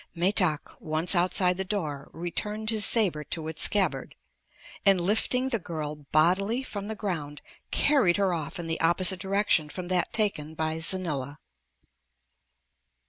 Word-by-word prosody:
Metak, 175 Hz, -3 st, +2 dB, 0.2 s
once 160 Hz, +3 st, +4 dB
outside 180 Hz, 0 st, +2 dB
the 190 Hz, -, -2 dB
door, 155 Hz, -8 st, -5 dB
returned 210 Hz, +6 st, -4 dB
his 215 Hz, -2 st, +2 dB
saber 190 Hz, -11 st, +3 dB
to 160 Hz, +1 st, -4 dB
its 160 Hz, 0 st, -1 dB
scabbard 200 Hz, -2 st, +3 dB, 0.7 s
and 195 Hz, -2 st, +4 dB
lifting 220 Hz, +8 st, 0 dB
the 230 Hz, -4 st, -1 dB
girl 150 Hz, -4 st, -7 dB
bodily 195 Hz, -, +2 dB
from 205 Hz, -5 st, -7 dB
the 220 Hz, -, -5 dB
ground 155 Hz, -9 st, -5 dB, 0.3 s
carried 260 Hz, -12 st, +2 dB
her 195 Hz, -3 st, +1 dB
off 155 Hz, -4 st, -5 dB
in 175 Hz, -, -6 dB
the 165 Hz, 0 st, -3 dB
opposite 180 Hz, +3 st, +3 dB
direction 195 Hz, -5 st, 0 dB
from 180 Hz, +2 st, -7 dB
that 180 Hz, -1 st, 0 dB
taken 200 Hz, -9 st, -2 dB
by 160 Hz, 0 st, -3 dB
Xanila. 155 Hz, -6 st, -2 dB
180 Hz, 140 wpm, -26 LUFS, 160-200 Hz, 0.7 s, once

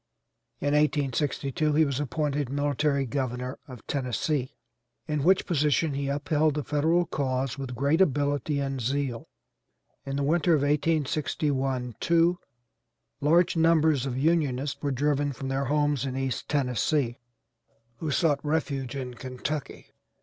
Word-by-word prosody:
In 145 Hz, 0 st, 0 dB
1862 145 Hz, 0 st, +1 dB
he 155 Hz, +1 st, +4 dB
was 140 Hz, -2 st, -2 dB
appointed 145 Hz, -1 st, -1 dB
military 145 Hz, 0 st, 0 dB
governor 125 Hz, 0 st, -3 dB
of 125 Hz, -5 st, -11 dB
Tennessee, 130 Hz, +1 st, -2 dB, 0.5 s
in 150 Hz, -2 st, -1 dB
which 190 Hz, +3 st, +4 dB
position 150 Hz, -1 st, +1 dB
he 140 Hz, 0 st, -2 dB
upheld 145 Hz, +1 st, +1 dB
the 150 Hz, -, -2 dB
Federal 160 Hz, +5 st, +2 dB
cause 135 Hz, -3 st, -2 dB
with 130 Hz, -2 st, -5 dB
great 140 Hz, +7 st, +2 dB
ability 145 Hz, -2 st, +1 dB
and 135 Hz, -2 st, -2 dB
zeal. 130 Hz, -1 st, -2 dB, 0.7 s
In 135 Hz, -, -4 dB
the 140 Hz, -, 0 dB
winter 165 Hz, +3 st, +3 dB
of 145 Hz, -, +1 dB
1861 145 Hz, -4 st, 0 dB
2 170 Hz, +1 st, +3 dB, 0.8 s
large 165 Hz, +5 st, +3 dB
numbers 160 Hz, -4 st, +3 dB
of 125 Hz, -1 st, -3 dB
Unionists 145 Hz, -2 st, 0 dB
were 145 Hz, -, -1 dB
driven 145 Hz, +1 st, 0 dB
from 135 Hz, +1 st, -5 dB
their 135 Hz, +1 st, -1 dB
homes 145 Hz, -1 st, +1 dB
in 130 Hz, -1 st, -3 dB
East 135 Hz, -3 st, -3 dB
Tennessee, 130 Hz, -1 st, 0 dB, 0.8 s
who 160 Hz, -, -4 dB
sought 145 Hz, -1 st, +1 dB
refuge 140 Hz, -4 st, -1 dB
in 130 Hz, -2 st, -4 dB
Kentucky. 130 Hz, +4 st, -5 dB
145 Hz, 135 wpm, -27 LUFS, 135-150 Hz, 0.8 s, he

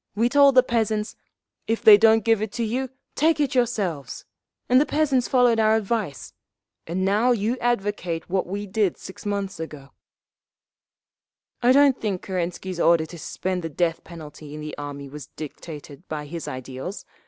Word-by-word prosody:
We 230 Hz, +3 st, +2 dB
told 280 Hz, 0 st, +5 dB
the 255 Hz, -, +7 dB
peasants, 220 Hz, -3 st, -1 dB, 0.5 s
'If 225 Hz, 0 st, -1 dB
they 215 Hz, -, +10 dB
don't 220 Hz, 0 st, +4 dB
give 225 Hz, -2 st, +3 dB
it 215 Hz, -1 st, -3 dB
to 235 Hz, -, -2 dB
you, 250 Hz, +4 st, -2 dB, 0.2 s
take 315 Hz, +2 st, +2 dB
it 290 Hz, -1 st, +1 dB
yourselves!' 210 Hz, -, -1 dB, 0.4 s
and 255 Hz, +2 st, +5 dB
the -, -, +2 dB
peasants 280 Hz, -5 st, +1 dB
followed 245 Hz, -3 st, +3 dB
our 220 Hz, 0 st, +4 dB
advice. 210 Hz, -, -3 dB, 0.5 s
And 185 Hz, +3 st, -1 dB
now 215 Hz, +6 st, +3 dB
you 225 Hz, +2 st, 0 dB
advocate 205 Hz, -8 st, -1 dB
what 185 Hz, 0 st, -1 dB
we 200 Hz, +3 st, -4 dB
did 200 Hz, -2 st, 0 dB
six 190 Hz, +2 st, -10 dB
months 200 Hz, -3 st, -3 dB
ago…. 150 Hz, -4 st, -8 dB, 1.7 s
"I 245 Hz, +1 st, +5 dB
don't 275 Hz, -1 st, +5 dB
think 200 Hz, -4 st, -2 dB
Kerensky's 180 Hz, 0 st, -4 dB
order 170 Hz, -2 st, +4 dB
to 170 Hz, +1 st, -11 dB
suspend 185 Hz, +4 st, -3 dB
the 165 Hz, -, -4 dB
death 165 Hz, +2 st, -1 dB
penalty 150 Hz, -3 st, -10 dB
in -, -, -7 dB
the 150 Hz, 0 st, -6 dB
army 145 Hz, -1 st, -7 dB
was 145 Hz, -1 st, -9 dB
dictated 150 Hz, +1 st, -9 dB
by 150 Hz, -1 st, -5 dB
his 165 Hz, +2 st, -7 dB
ideals. 130 Hz, -, -6 dB
200 Hz, 165 wpm, -24 LUFS, 165-235 Hz, 1.7 s, they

